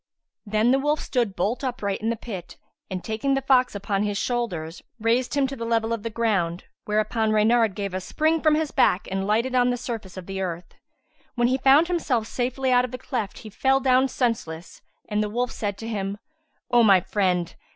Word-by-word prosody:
Then 215 +3 +2
the 270 - +3
wolf 295 +2 +1
stood 235 -7 -1
bolt 225 +9 -1
upright 215 -7 -2
in 225 - 0
the 230 - 0
pit 195 -6 -8 0.3
and, 185 -1 -4
taking 225 +5 0
the 270 - 0
fox 255 -4 +3
upon 200 0 -1
his 205 -1 -1
shoulders, 185 -10 -3 0.2
raised 235 +5 +1
him 280 -1 +3
to 270 +1 -4
the 230 - -6
level 230 0 0
of 230 - -3
the 230 - -4
ground, 195 -7 0 0.2
whereupon 215 +1 0
Reynard 220 -1 +3
gave 200 -2 -4
a 185 - -2
spring 315 - 0
from 310 -1 +4
his 310 -1 -1
back 180 - +2
and 195 0 -1
lighted 230 +5 +1
on 250 -1 +3
the 245 - 0
surface 225 -7 -6
of 185 - -7
the 195 0 -4
earth. 175 -2 -5 0.6
When 240 0 +2
he 260 +1 +1
found 275 +5 +5
himself 280 -10 0
safely 255 +3 -1
out 250 0 +5
of 250 - -3
the 255 - -6
cleft 230 -6 -4
he 215 - -8
fell 265 +6 +2
down 260 0 +3
senseless 195 -11 -3 0.3
and 210 0 0
the 210 - -1
wolf 245 +3 -1
said 205 -2 -3
to 225 - -7
him, 200 -2 -3 0.5
"O 240 -1 +6
my 200 -4 +6
friend! 180 -2 0
225 Hz, 210 wpm, -24 LUFS, 200-255 Hz, 0.6 s, O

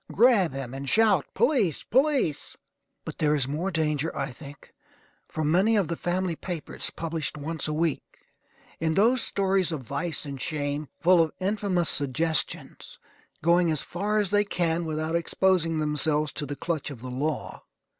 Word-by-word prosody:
Grab 220 - +4
him, 135 -2 -6
and 135 0 -5
shout 215 -8 +3
"Police! 230 - +2
police!" 265 - +1 0.5
But - - -7
there 150 -1 +3
is 135 -3 +1
more 155 +7 -2
danger, 155 -2 0
I 140 0 -2
think, 140 +2 -13 0.5
from 155 -1 -1
many 195 +7 +4
of 195 -6 +1
the 170 - -1
family 175 0 -1
papers, 170 -1 -5
published 160 -2 -3
once 155 +2 -3
a 155 - -2
week; 160 -1 0 0.8
in 160 -1 0
those 235 +5 +4
stories 195 -4 +1
of 155 -4 -3
vice 140 +6 -2
and 140 -2 -6
shame, 145 -1 -2
full 175 0 +6
of 160 - 0
infamous 190 -3 0
suggestions, 155 +4 0 0.5
going 170 +1 +4
as 155 -3 0
far 205 +4 -2
as 205 -3 +1
they 205 0 +4
can 170 -4 0
without 155 +1 -2
exposing 170 -1 +1
themselves 150 0 +1
to 145 - -4
the 145 - -4
clutch 160 -1 -3
of 135 -6 -9
the 125 0 -6
law. 145 +4 -3
165 Hz, 165 wpm, -26 LUFS, 150-185 Hz, 0.8 s, full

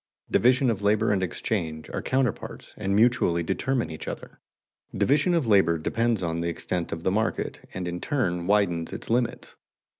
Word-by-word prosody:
Division 125 +1 +4
of 105 -3 -3
labor 105 +2 +2
and 100 -2 +1
exchange 80 -4 -3
are - - -3
counterparts 130 -4 -2
and 100 -2 -1
mutually 105 -7 +3
determine 125 +5 -1
each 80 - -8
other. - - -7 0.6
Division 150 +6 +3
of 165 -5 +1
labor 95 -6 +4
depends 115 +5 0
on 85 0 -1
the 85 - -1
extent 85 +1 -3
of 80 0 -5
the 95 - +1
market, 110 +3 -2
and 90 -1 -3
in 90 0 -4
turn 90 - -1
widens 90 -5 +1
its - - -5
limits. 120 0 -1
100 Hz, 170 wpm, -26 LUFS, 85-120 Hz, 0.6 s, Division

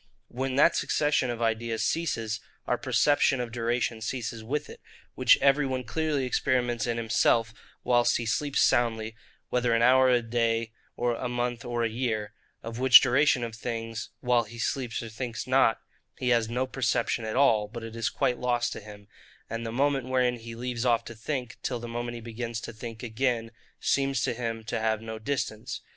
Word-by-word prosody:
When 130 +1 -3
that 150 +5 +5
succession 150 -4 +1
of 120 -1 -2
ideas 115 0 -1
ceases, 115 -10 -1 0.3
our - - +1
perception 145 -2 +2
of 120 -2 -3
duration 120 -1 -1
ceases 115 -1 -4
with 145 +6 -2
it; - - -12 0.3
which - - +5
every 140 0 +4
one 130 -1 -2
clearly 150 +2 -1
experiments 125 -2 0
in 120 -1 -1
himself, 115 0 +2 0.3
whilst 120 -1 +3
he 120 - -4
sleeps 140 +5 0
soundly, 115 -2 +1 0.3
whether 125 -2 +2
an 115 - +2
hour 130 +1 +6
or - - +4
a 120 -1 +3
day, 115 -1 0 0.3
a 120 +1 -1
month 120 -1 -2
or 120 -1 -2
a - - +2
year; 110 -3 -2 0.3
of 115 +1 -6
which 130 -1 +9
duration 130 0 +3
of 115 -1 -4
things, 115 -1 -5
while 120 -2 +2
he 115 +2 -11
sleeps 120 0 -2
or 115 - -7
thinks 110 -1 -5
not, 130 -3 +3 0.4
he 125 - -1
has 115 -2 +2
no 125 +2 0
perception 120 -3 0
at 110 0 -3
all, 115 -6 +4
but 115 +2 -8
it 115 0 -8
is 115 -1 0
quite 125 - 0
lost 120 -1 0
to - - -7
him; 105 -1 -12 0.4
and 115 0 -3
the - - -4
moment 135 +1 +1
wherein 125 -1 +2
he 115 0 -9
leaves 120 0 -3
off 120 -2 +2
to 115 - -7
think, 125 +2 -4
till 125 -2 -2
the 120 - -7
moment 120 +1 -4
he 120 - -7
begins 115 0 -5
to 115 - -8
think 115 +1 -8
again, 115 -1 -1 0.3
seems 135 -1 +1
to - - 0
him 115 -1 -4
to 110 - -3
have 110 -1 +1
no 110 0 -7
distance. 115 -2 -3
120 Hz, 190 wpm, -28 LUFS, 115-125 Hz, 0.4 s, which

